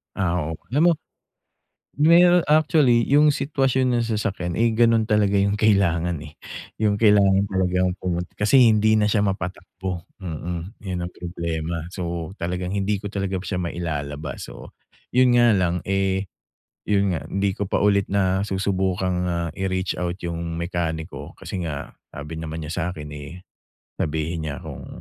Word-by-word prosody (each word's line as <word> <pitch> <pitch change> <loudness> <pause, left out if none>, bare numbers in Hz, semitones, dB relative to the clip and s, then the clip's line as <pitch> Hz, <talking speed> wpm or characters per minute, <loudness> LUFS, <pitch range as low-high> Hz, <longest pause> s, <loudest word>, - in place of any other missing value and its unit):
Ah, 90 -2 0
oo. 80 - -4 0.2
Alam 145 +4 +2
mo - - +6 1.1
ngayon 170 +3 +6
actually 150 -6 +4
yung 150 +2 +5
sitwasyon 135 -3 +1
ng 120 - +1
sasakyan, 105 -6 -2
eh, 115 +6 +2
ganun 115 -1 +4
talaga 100 -2 +3
yung 100 +1 +1
kailangan 90 -6 +2
eh. 75 0 -11 0.4
Yung 105 -2 +1
kailangan 100 -2 +4
talagang 90 -1 +1
pumunta, 90 -2 -3
kasi 120 +4 +5
hindi 110 0 +4
na 105 - +3
siya 105 0 +2
mapatakbo, 95 -2 -4 0.2
mm, 85 +3 -5
yun 90 -2 -3
ang 85 - -3
problema. 85 -1 -4
So 85 -1 -5
talagang 90 +1 -3
hindi 100 0 0
ko 100 - -5
talaga 100 -2 -2
siya 95 0 -4
mailalabas. 80 -4 -4
So - - -12 0.3
yun 125 0 +4
nga 120 -3 +5
lang, 90 -1 +1
eh, 95 0 0 0.6
yun 100 -2 +2
nga 80 - -4
hindi 100 0 0
ko 100 +1 -4
pa - - +1
ulit 100 -1 +3
na 95 -1 +1
susubukang, 95 -2 0
ah, 85 -1 -1
i-reach-out 95 -1 -2
yung 85 -1 -3
mekaniko, 85 -2 -4
kasi 95 - -6
nga 70 -2 -6 0.2
sabi 75 +3 -7
naman 80 0 -5
niya 75 - -5
sa'kin, 80 -4 -4
eh, 75 +5 -9 0.6
sabihin 80 +1 -2
niya 70 - -6
kung - - -8
95 Hz, 150 wpm, -23 LUFS, 85-105 Hz, 1.1 s, mo